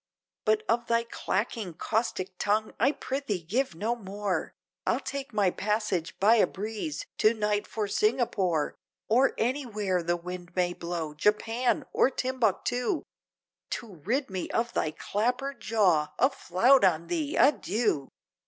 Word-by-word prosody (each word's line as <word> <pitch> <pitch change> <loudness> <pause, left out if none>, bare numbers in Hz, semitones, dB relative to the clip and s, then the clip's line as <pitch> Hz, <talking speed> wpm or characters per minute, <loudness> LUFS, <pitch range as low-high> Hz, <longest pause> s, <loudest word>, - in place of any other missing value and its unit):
But 215 -1 +3
of 235 +1 +1
thy 230 0 +2
clacking 205 -4 -3
caustic 195 -4 -1
tongue, 215 +1 +1
I 260 +6 +4
prithee 260 - -3
give 225 +4 -1
no 220 +8 -1
more, 200 -3 -3 0.4
I'll - - +2
take 275 -2 -5
my 205 -4 +2
passage 210 -5 -1
by 220 +4 +6
a - - +5
breeze, 220 - -4
to 215 +2 +5
night 210 -1 0
for 215 -2 -2
Singapore, 200 - +1 0.4
Or 250 +5 +4
anywhere 215 -7 0
the 175 +1 0
wind 175 0 -8
may 180 -1 +1
blow, 170 -3 -4
Japan! 230 - +1
or - - +4
Timbuctoo! 250 - 0 0.7
To 220 -6 -5
rid 235 - -1
me 185 -2 -3
of 235 +1 -1
thy 155 - +1
clapper 250 - -1
jaw, 195 - +1
a 260 +3 +4
flout 250 +3 +4
on 170 -3 +3
thee! 310 - -2
Adieu!" 225 - +2
215 Hz, 140 wpm, -28 LUFS, 185-245 Hz, 0.7 s, by